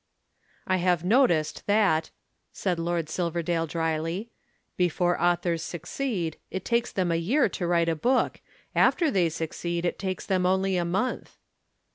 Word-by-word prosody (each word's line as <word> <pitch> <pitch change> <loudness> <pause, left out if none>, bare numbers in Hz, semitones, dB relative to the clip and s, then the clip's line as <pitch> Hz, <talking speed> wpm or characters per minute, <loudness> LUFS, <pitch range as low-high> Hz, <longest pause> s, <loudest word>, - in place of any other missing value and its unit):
"I 185 -1 +1
have 175 -2 +1
noticed 180 - +2
that," 200 -7 +3 0.4
said 180 -3 -2
Lord 170 -1 -1
Silverdale 170 0 -1
dryly, 165 +6 -2 0.4
"before 175 -1 +1
authors 175 -1 +1
succeed, 175 - -3
it 190 - -5
takes 235 0 +1
them 180 -3 0
a - - +2
year 260 - +3
to 175 - -3
write 170 -1 +2
a 165 - +1
book, 250 +11 +1 0.3
after 325 -5 +3
they 180 -6 +2
succeed 170 +2 -3
it 175 - -1
takes 190 -2 -3
them 185 -2 +1
only 190 +1 +2
a 175 -1 +1
month." 195 +9 -2
175 Hz, 145 wpm, -27 LUFS, 165-190 Hz, 0.4 s, that